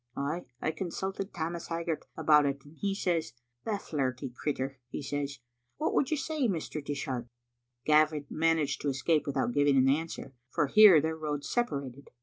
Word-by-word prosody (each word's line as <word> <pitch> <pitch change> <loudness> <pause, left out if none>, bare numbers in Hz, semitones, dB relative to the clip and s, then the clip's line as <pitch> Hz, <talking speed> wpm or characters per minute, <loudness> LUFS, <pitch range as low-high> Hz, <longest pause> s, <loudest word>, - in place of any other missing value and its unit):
Ay, 150 +5 -2
I 155 - 0
consulted 190 +4 -4
Tammas 170 0 -4
Hag 165 0 -3
gart 165 -2 -2
about 150 -2 +5
it, 140 0 -3
and 145 +2 -15
he 195 +3 -1
says, 175 -5 -1 0.3
*The 215 -2 0
flirty 130 -6 -3
crittur,' 135 -2 -3
he - - -4
says. 140 0 -3 0.4
What 310 - 0
would 265 - +2
you 310 - +1
say, 290 -2 0
Mr. 160 -5 -3
Dishart?" 135 -4 -3 0.6
Gavin 155 -1 +4
managed 160 -3 +1
to 145 - 0
escape 145 +4 +1
without 135 -3 0
giving 145 0 +4
an 130 0 +5
answer, 145 -1 -1 0.2
for 150 - +1
here 195 +2 +8
their 160 +1 -1
roads 150 -2 -4
separated. 140 - -2
150 Hz, 170 wpm, -30 LUFS, 140-170 Hz, 0.6 s, here